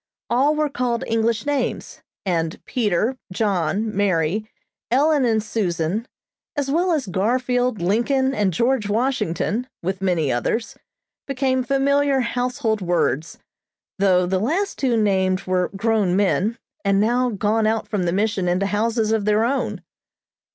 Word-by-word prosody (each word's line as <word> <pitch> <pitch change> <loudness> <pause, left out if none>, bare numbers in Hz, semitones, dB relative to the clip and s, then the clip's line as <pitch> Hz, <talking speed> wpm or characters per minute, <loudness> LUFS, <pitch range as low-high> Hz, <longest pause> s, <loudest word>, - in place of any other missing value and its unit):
All 275 +5 +3
were 305 0 +1
called 245 -4 -1
by - - -5
English 225 +2 +1
names, 290 -1 -2 0.2
and 165 -3 -1
Peter, 225 +2 0
John, 200 +1 0
Mary, 195 +1 0 0.4
Ellen 285 +3 +3
and 220 -2 +1
Susan, 200 0 -1 0.5
as 280 -2 -1
well 350 +4 +2
as 305 -5 0
Garfield, 245 +2 0
Lincoln 260 +8 +1
and 205 -7 +1
George 235 +3 +1
Washington, 230 -1 -1 0.2
with 190 +2 -2
many 175 -7 +1
others, 170 - -1 0.5
became 260 -1 0
familiar 275 +1 +2
household 245 -2 -1
words, 170 -4 0 0.6
though 185 -2 +4
the 185 +1 0
two - - -2
last 365 - -1
named 195 -6 +2
were 185 -1 0
grown 205 -3 +1
men, 205 +3 +1 0.3
and 200 -1 +2
now 245 +4 +2
gone 215 +1 +1
out 220 0 0
from 200 -4 -1
the 170 - +1
Mission 200 -1 0
into 180 +3 +1
houses 220 +2 0
of 220 -2 +1
their 210 +1 +3
own. 235 -7 -2
220 Hz, 140 wpm, -22 LUFS, 190-255 Hz, 0.6 s, though